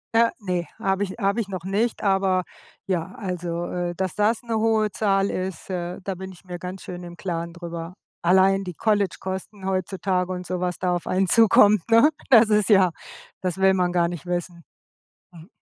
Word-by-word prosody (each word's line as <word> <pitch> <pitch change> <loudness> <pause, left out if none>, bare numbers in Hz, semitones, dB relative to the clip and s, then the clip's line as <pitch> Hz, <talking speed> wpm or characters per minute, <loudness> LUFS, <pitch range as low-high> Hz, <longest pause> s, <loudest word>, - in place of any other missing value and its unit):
Äh, 230 0 +5
ne. 180 -4 -2
Habe 195 +1 0
ich 200 - -3
habe 200 +2 +1
ich 200 - -6
noch 185 -3 -6
nicht, 210 +5 0
aber 195 -2 +2 0.4
ja, 185 0 -2
also, 175 -4 -3
äh, 175 -1 -3
dass 185 0 -3
das 215 +3 +1
‘ne 230 -1 -2
hohe 220 -1 +2
Zahl 195 -2 +1
ist, 185 -1 -4
äh, 175 -1 -4
da 195 - -2
bin 190 +1 -8
ich 185 +1 -17
mir 180 -1 -6
ganz 180 +2 -7
schön 180 0 -7
im 175 0 -10
Klaren 170 -2 -4
drüber. 170 0 -7 0.3
Allein 190 +2 +4
die 180 -2 -6
College-Kosten 195 -1 -2
heutzutage 185 -1 -1
und 180 0 -5
so 180 0 -3
was 180 -1 -2
da 180 -1 +1
auf 175 - -4
einen 190 +1 +1
zukommt, 210 -1 +6
ne? 230 +7 +7 0.2
Das 230 -4 +7
ist 210 -2 +2
ja 190 -4 +5 0.5
das 185 -1 -2
will 190 0 +4
man 180 -2 +1
gar 175 -1 +2
nicht 170 -2 -7
wissen. 175 -1 -4 0.7
Mhm. 170 0 -14
185 Hz, 190 wpm, -24 LUFS, 175-200 Hz, 0.7 s, ne